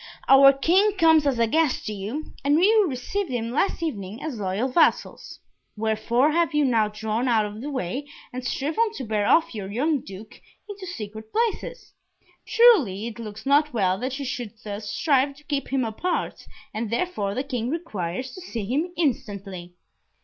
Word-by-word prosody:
"Our 275 0 +8
King 360 +10 +3
comes 320 -4 +5
as 270 -3 +1
a 230 - +3
guest 310 +4 +1
to 215 - -3
you, 215 +10 -6
and 290 +3 +3
you 420 +2 +4
received 340 +9 -3
him 235 -2 -3
last 335 +5 0
evening 215 - -5
as 295 -8 -4
loyal 200 +5 -1
vassals. 270 +6 +1 0.4
Wherefore 225 +6 +1
have 330 -1 +1
you 295 -1 +3
now 225 -4 +3
drawn 220 +3 -2
out 225 -3 +3
of 210 +1 -7
the 290 - -5
way, 265 +2 -3 0.3
and 255 0 -5
striven 320 - 0
to 270 - -6
bear 215 -3 -1
off 325 - +3
your 200 -3 -6
young 285 +7 +1
Duke 195 +3 -11 0.3
into 405 -2 -8
secret 220 - -8
places? 470 +2 -2 0.5
Truly 345 - +4
it 235 0 -7
looks 215 0 -8
not 290 +1 +3
well 190 -3 +1
that 260 +2 -3
you 280 - -5
should 245 -4 -4
thus 205 0 -6
strive 280 0 +1
to 300 - -18
keep 285 -2 -3
him 265 -2 0
apart, 335 +11 -3 0.3
and 220 +1 -3
therefore 220 - -2
the 260 - -1
King 250 -4 -3
requires 255 - -4
to 370 - -9
see 235 - -5
him 295 - -1
instantly." 200 - -3
255 Hz, 180 wpm, -24 LUFS, 215-310 Hz, 0.5 s, Our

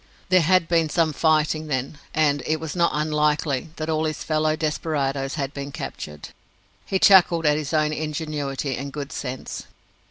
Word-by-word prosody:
There 185 -1 +5
had 175 +1 +3
been 165 -2 +2
some 160 0 +1
fighting, 155 0 +2
then, 140 +1 -3
and 145 -2 +2
it 155 0 +1
was 160 +1 -5
not 170 -1 +3
unlikely 150 -1 0
that 155 - -4
all 160 0 0
his 155 -1 -3
fellow 155 0 +1
desperadoes 145 -3 -1
had 140 -3 -3
been 140 0 -6
captured! 75 - -7 0.6
He 190 - +1
chuckled 180 -4 +6
at 150 0 +4
his 150 -1 -3
own 155 -1 +2
ingenuity 150 -3 -3
and 140 +1 -5
good 140 -1 -6
sense. 130 -1 -6
155 Hz, 165 wpm, -23 LUFS, 140-160 Hz, 0.6 s, chuckled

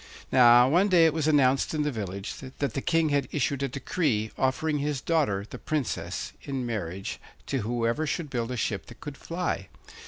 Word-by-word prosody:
Now, 120 -1 +7
one 175 +8 +4
day 175 -4 +5
it 160 - +3
was 155 -2 0
announced 140 -1 +3
in 150 - +1
the 150 - 0
village 100 -4 -5
that 135 +1 -4
the 135 - -2
King 165 -1 +2
had 140 -3 +1
issued 140 -1 0
a 140 - +1
decree, 125 -4 -1
offering 150 +3 0
his 145 -1 -1
daughter, 130 -12 0
the - - -9
Princess, 150 -6 -3
in 135 -3 -4
marriage 95 -5 -4 0.3
to 135 - -1
whoever 120 +6 -1
should 150 -1 -3
build 120 -2 -2
a 125 - -3
ship 100 -4 -2
that 115 - -13
could 145 -1 -7
fly. 165 - -3
135 Hz, 190 wpm, -27 LUFS, 115-150 Hz, 0.3 s, Now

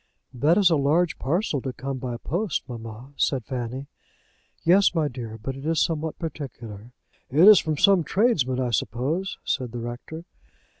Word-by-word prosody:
"That 145 +7 +3
is 195 -4 +5
a 160 - +4
large 155 +5 +1
parcel 155 0 -1
to 130 0 -4
come 135 +1 -5
by 125 -2 -4
post, 175 - -2
mamma," 115 +2 -9
said 130 -5 0
Fanny. 130 0 -4 0.8
"Yes, 185 +2 +4
my 160 -2 +2
dear; 115 -4 -7
but 130 +5 -5
it 135 - -9
is 160 +1 0
something 160 -1 0
particular." 120 - -8 0.4
"It's 180 +9 +8
from 155 -2 -2
some 195 +1 +5
tradesman, 150 - +1
I 125 -2 -1
suppose?" 135 - -2
said 125 -3 -2
the 120 - -4
rector. 120 +8 -7
140 Hz, 160 wpm, -25 LUFS, 125-165 Hz, 0.8 s, It's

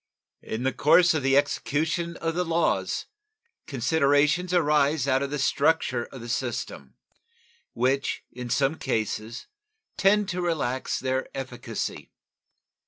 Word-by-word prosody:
In 110 +3 -5
the 130 - +1
course 170 +4 +5
of 155 - 0
the 135 0 +3
execution 160 +4 0
of 165 0 -2
the 180 +2 0
laws 170 0 0 0.6
considerations 145 +5 +2
arise 150 -4 +2
out 135 0 +2
of 140 - -2
the 145 - -3
structure 140 -3 +1
of 130 - -11
the 120 - -8
system 120 - -4 0.8
which 130 +3 0
in 125 0 -7
some 135 +5 +1
cases 110 +1 -3 0.5
tend 205 +1 +3
to 180 -1 -2
relax 145 -7 -1
their 130 0 -1
efficacy. 125 -4 -5
140 Hz, 125 wpm, -26 LUFS, 130-160 Hz, 0.8 s, course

